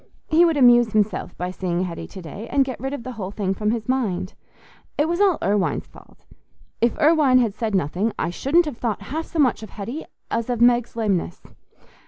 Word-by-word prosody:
He 330 +3 +6
would 330 -3 +2
amuse 240 -4 +5
himself 210 -4 0
by 180 +1 -3
seeing 180 -1 -2
Hetty 170 -2 -5
to 190 - -10
day, 200 +7 -8
and 275 -1 +3
get 260 -3 -6
rid 265 +3 -3
of 285 -4 -5
the 255 - -6
whole 205 -6 -5
thing 200 -1 -2
from 210 +2 -1
his 225 -1 -2
mind. 210 -9 -1 0.6
It 295 +2 +2
was 345 +3 0
all 385 -5 +4
Irwine's 200 -1 0
fault. - - -19 0.6
"If 235 +1 +2
Irwine 300 -4 +4
had 235 -5 +2
said 215 -1 -2
nothing, 185 +6 0
I - - -1
shouldn't 310 - +2
have 295 -6 -5
thought 220 -4 -2
half 315 +10 -4
so - - -7
much 260 -7 +3
of 220 - -9
Hetty 230 +12 -6 0.3
as 230 +1 -1
of 245 -2 -1
Meg's 240 0 +3
lameness." 200 - -1
230 Hz, 210 wpm, -22 LUFS, 200-270 Hz, 0.6 s, He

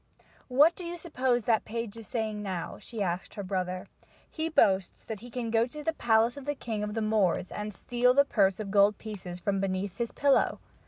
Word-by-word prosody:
"What 290 +6 +5
do 365 - -6
you 345 0 -5
suppose 260 -8 0
that 220 0 +2
page 230 -1 -4
is 225 -2 -10
saying 220 -4 -2
now?" 185 -4 -4
she 225 -4 -4
asked 180 0 -3
her 205 - -4
brother. 185 -1 -2 0.4
"He 320 0 -3
boasts 195 - +2
that 220 -2 -5
he 245 +4 -11
can 235 -1 -3
go 230 +1 +3
to 300 +4 -9
the 325 - 0
palace 230 -1 +2
of 280 - -8
the 290 0 -1
king 225 -5 -4
of 210 +1 -3
the 225 - 0
Moors 210 -5 +1
and 210 0 -4
steal 245 +4 +1
the 280 0 +6
purse 195 -6 +2
of 205 -2 -4
gold 205 +1 +5
pieces 185 -5 -7
from 195 +1 0
beneath 195 0 -2
his 235 -1 -1
pillow." 280 -1 +2
220 Hz, 215 wpm, -29 LUFS, 200-245 Hz, 0.4 s, the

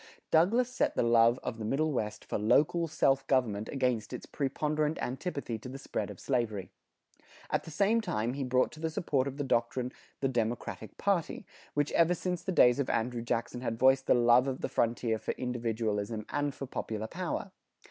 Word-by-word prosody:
Douglas 215 +10 +4
set 255 - 0
the - - +2
love 115 +1 +5
of 115 - -4
the - - -4
Middle 150 +8 +1
West 105 -6 -3
for - - -2
local 150 +10 +3
self 135 -3 +2
government 110 -5 +1
against 125 -6 -1
its - - -6
preponderant 150 +2 -1
antipathy 130 -3 -3
to 125 - -8
the 135 - -7
spread 135 - -4
of - - -9
slavery. 115 -7 -1 0.8
At - - 0
the - - -8
same 200 +8 +2
time 120 - -1
he 140 0 -3
brought 130 0 +2
to 155 - -12
the 160 0 -1
support 145 -4 0
of 140 0 -5
the 145 - -1
doctrine 125 0 0 0.3
the 135 - +1
Democratic 115 -3 -3
party, 195 -5 0 0.3
which 145 0 +1
ever 170 +1 +4
since 180 0 -2
the 190 - -3
days 125 -7 +5
of 140 - 0
Andrew 120 +1 0
Jackson 115 +1 -2
had 115 -3 -2
voiced 135 +2 +4
the - - +5
love 120 +2 +5
of 130 -1 -3
the - - -2
frontier 115 -1 0
for - - -3
individualism 110 -3 -2
and 145 -1 -1
for 135 - -5
popular 110 -4 -4
power. 180 - -4
130 Hz, 190 wpm, -31 LUFS, 115-150 Hz, 0.8 s, love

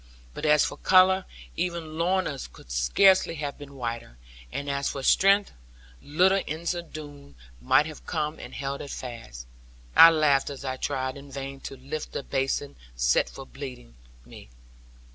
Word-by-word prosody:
But 155 - -3
as 150 -1 +5
for - - -5
colour, 185 0 +5 0.3
even 170 -3 -3
Lorna's 170 -4 -1
could - - -15
scarcely 165 - +4
have 145 -2 -5
been 140 -1 -11
whiter; 115 - -5 0.3
and 140 - -4
as 140 0 -1
for 135 - -5
strength, 195 +7 +4 0.5
little 185 +6 +3
Ensie 170 +3 -2
Doone 145 -2 -10 0.3
might 105 - +4
have 155 -1 -10
come 155 -2 -2
and - - -9
held 140 0 -4
it 140 - -8
fast. 115 - -8 0.5
I 165 - +11
laughed 150 -4 +2
as 140 -1 -8
I 130 0 -3
tried 130 -1 -2
in 140 0 -12
vain 135 0 -6
to 135 - -8
lift 140 +4 -6
the - - -4
basin 135 - -2 0.2
set - - +2
for 135 - -10
bleeding 130 - -9 0.3
me. - - -13
140 Hz, 160 wpm, -26 LUFS, 135-160 Hz, 0.5 s, I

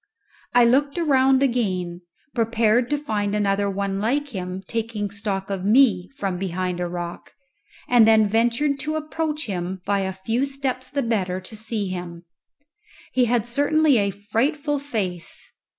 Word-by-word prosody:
I 245 -1 +7
looked 280 +6 +2
around 270 -4 +4
again, 185 -9 -1 0.3
prepared 230 0 +2
to 295 - +1
find 210 -8 -2
another 200 -1 +1
one 195 0 -2
like 280 +7 0
him 185 -4 -5
taking 220 -3 -3
stock 200 -1 -3
of 190 -2 -3
me 205 -4 +4
from 190 -3 -2
behind 180 -1 -2
a 175 - -1
rock, 175 0 -6 0.5
and 240 -3 +6
then 220 -1 +5
ventured 240 +7 +1
to 310 +2 -2
approach 310 0 -2
him 185 -2 -3
by 200 0 +1
a 190 -1 -1
few 225 +8 -1
steps 265 -2 -3
the 280 +1 -1
better 190 -6 -1
to 185 +4 -9
see 215 -2 -3
him. 175 -1 -6 0.9
He 255 -1 +4
had 240 -2 +1
certainly 285 +2 +3
a 200 -1 +1
frightful 270 - -1
face. 200 -11 -3
220 Hz, 150 wpm, -23 LUFS, 195-265 Hz, 0.9 s, I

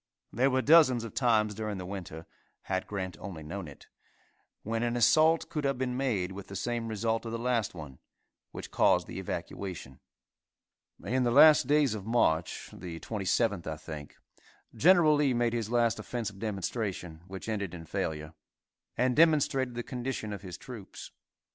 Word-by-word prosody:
There 130 +4 +3
were 130 0 +1
dozens 145 -7 +6
of 115 - -7
times 110 -4 +2
during 105 -1 -4
the 90 - -6
winter, 90 -4 -7 0.4
had 95 -1 -2
Grant 95 -5 -4
only 85 -6 -7
known 85 +3 -6
it, 70 - -13 0.8
when 115 +1 -2
an 120 0 0
assault 160 +7 +4
could 150 - -3
have 140 -2 0
been 125 -1 -2
made 110 -9 -1
with 95 0 -8
the 100 - -9
same 120 +2 -2
result 110 +1 -1
of 115 - -5
the 115 - -2
last 115 -4 -1
one, 75 -5 -9 0.5
which - - -8
caused - - +3
the - - -7
evacuation. 85 -9 -6 1.1
In 130 +2 +1
the 120 - +2
last 145 +2 +7
days 145 -4 +3
of 105 -1 -6
March, 85 -9 +1
the 85 -2 -7
27th, 100 -1 -1
I 80 -1 -3
think, 75 -2 -9 0.6
Gen. 170 -3 +5
Lee 140 -4 +2
made 120 -1 +1
his 115 -3 -2
last 115 -2 +2
offensive 110 -3 -5
demonstration, 100 -5 -4
which 95 +2 -8
ended 100 -5 -3
in 80 -1 -9
failure, 75 0 -4 0.6
and 125 +1 +2
demonstrated 145 -6 +3
the 120 - -3
condition 125 -4 -4
of 100 - -7
his 90 -3 -8
troops. 115 -7 -10
110 Hz, 165 wpm, -30 LUFS, 95-125 Hz, 1.1 s, last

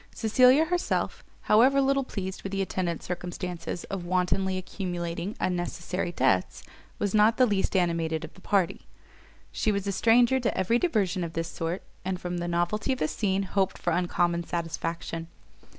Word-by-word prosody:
Cecilia 255 +7 +5
herself, 355 +2 -1 0.2
however 255 +6 +5
little 275 0 +2
pleased 190 -6 -5
with 195 - -5
the 195 0 0
attendant 175 -3 -2
circumstance 180 0 -5
of 195 -2 -5
wantonly 185 +1 0
accumulating 175 0 -4
unnecessary 175 0 -2
debts, 95 - +1 0.3
was 205 -2 -1
not 215 +2 +5
the 255 - +6
least 205 -3 0
animated 165 -3 +1
of 160 - -13
the 185 - -17
party: 190 -4 0 0.6
she 215 - 0
was 200 -1 -2
a 200 - 0
stranger 235 +6 +4
to 240 -2 -1
every 230 +6 +2
diversion 200 - +1
of 165 -1 -5
this 165 0 -2
sort, 165 +3 -3 0.2
and 185 0 -2
from 180 -1 -3
the 175 - -3
novelty 175 +9 0
of - - -4
the 155 - 0
scene, 195 +2 0
hoped 195 0 0
for 175 - -1
uncommon 175 0 +1
satisfaction. 165 0 -4
185 Hz, 165 wpm, -27 LUFS, 175-210 Hz, 0.6 s, the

